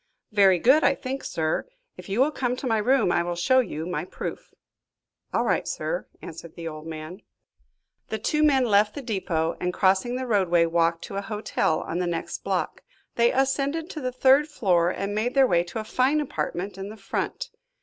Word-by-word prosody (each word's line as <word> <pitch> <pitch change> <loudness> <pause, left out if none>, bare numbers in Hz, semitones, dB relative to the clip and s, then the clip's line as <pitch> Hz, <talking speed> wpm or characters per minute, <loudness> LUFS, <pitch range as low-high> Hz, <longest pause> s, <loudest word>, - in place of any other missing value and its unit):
"Very 195 -3 +5
good, 260 - +4
I 275 - +4
think, 265 +1 -5
sir. 160 - -1 0.3
If - - -11
you 205 +6 +1
will 290 +3 +3
come 250 -4 -1
to 260 - -7
my 225 -3 +2
room, 250 -3 +3
I 175 - +2
will 175 0 -3
show 260 +10 +3
you 160 -10 -2
my 180 +1 -3
proof." - - -7 0.8
"All - - +1
right, - - 0
sir," - - -3 0.2
answered 165 0 -9
the 170 -1 -6
old 155 0 -7
man. 160 +4 -7 0.9
The 220 - -3
two 300 +8 0
men 275 -4 +4
left 210 -1 +3
the 285 - -6
depot, 175 -7 -1
and 180 - 0
crossing 190 +6 +2
the 260 0 -3
roadway, 185 -7 +3
walked 165 0 +1
to 195 - -6
a - - -1
hotel 210 -6 -1
on 170 - -3
the 180 - 0
next 170 -1 -4
block. - - -2 0.3
They 235 0 +3
ascended 275 +5 0
to 310 - -6
the 255 -1 -2
third 265 +4 +4
floor 180 - +2
and 200 +2 -3
made 225 +5 -1
their 270 -1 +6
way 175 -7 +2
to 175 - -7
a - - -3
fine 255 +7 +1
apartment 195 -9 -3
in 195 +1 -5
the 215 - -10
front. - - -4
210 Hz, 200 wpm, -25 LUFS, 175-260 Hz, 0.9 s, their